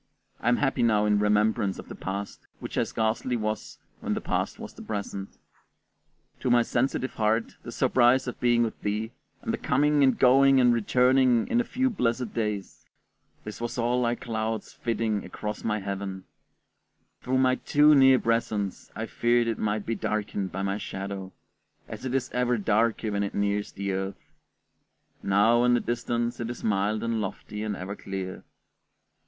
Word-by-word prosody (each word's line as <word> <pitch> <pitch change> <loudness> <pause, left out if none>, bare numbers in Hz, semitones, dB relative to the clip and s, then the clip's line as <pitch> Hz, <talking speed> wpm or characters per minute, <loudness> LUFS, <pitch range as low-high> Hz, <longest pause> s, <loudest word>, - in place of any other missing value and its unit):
I - - +1
am 120 - +3
happy 135 -1 0
now 110 -3 +3
in 105 -1 +3
remembrance 105 0 +2
of - - -9
the - - -8
past, 100 +1 -6
which - - -7
I - - +2
scarcely 115 +2 -1
was 110 -1 -4 0.2
when - - -2
that - - -3
past - - -2
was - - -9
the - - -12
present. 100 -2 -5 1.0
To - - -1
my 120 -1 +5
sensitive 130 +2 -1
heart 110 +1 0
the - - -8
surprise 125 +1 +3
of 125 - -6
being 120 -1 +3
with 115 - -4
thee, 105 +2 -2 0.3
the - - -2
coming 145 +2 +2
and 130 -3 +4
going 135 +1 +6
and 125 -1 +5
returning 125 +1 +3
in 240 - +3
a - - -2
few 260 +2 0
blessed 125 - -1
days 105 -3 -3 0.6
this 105 +1 -8
was 120 +1 -3
all 120 +1 +1
like 120 0 0
clouds 110 -1 -3
flitting 115 -3 -1
across 105 0 -6
my 105 -1 0
heaven; 100 -1 -5 1.0
through 130 +1 0
my 130 -1 +4
too 150 +1 +4
near 135 -2 +7
presence 110 -5 -1
I 110 - -3
feared 120 +1 +2
it 115 - -2
might 105 -1 -1
be 115 - -1
darkened 105 -2 -2
by 95 +1 -3
my 100 +1 -1
shadow, 95 -1 -6 0.6
as - - -8
it 130 0 -2
is 130 -1 -1
ever 125 -1 +1
darker 110 +1 +1
when 100 0 -1
it 100 - -3
nears 100 0 0
the 100 0 -3
earth; 95 +1 -5 0.9
now, 110 +5 +3
in 125 0 +4
the - - +2
distance, 120 0 -2
it 115 -1 -3
is 120 - -7
mild 105 0 0
and 115 -1 -1
lofty 105 0 -5
and 105 -1 -2
ever 95 +2 -6
clear. 95 -2 -6
115 Hz, 175 wpm, -27 LUFS, 105-125 Hz, 1.0 s, near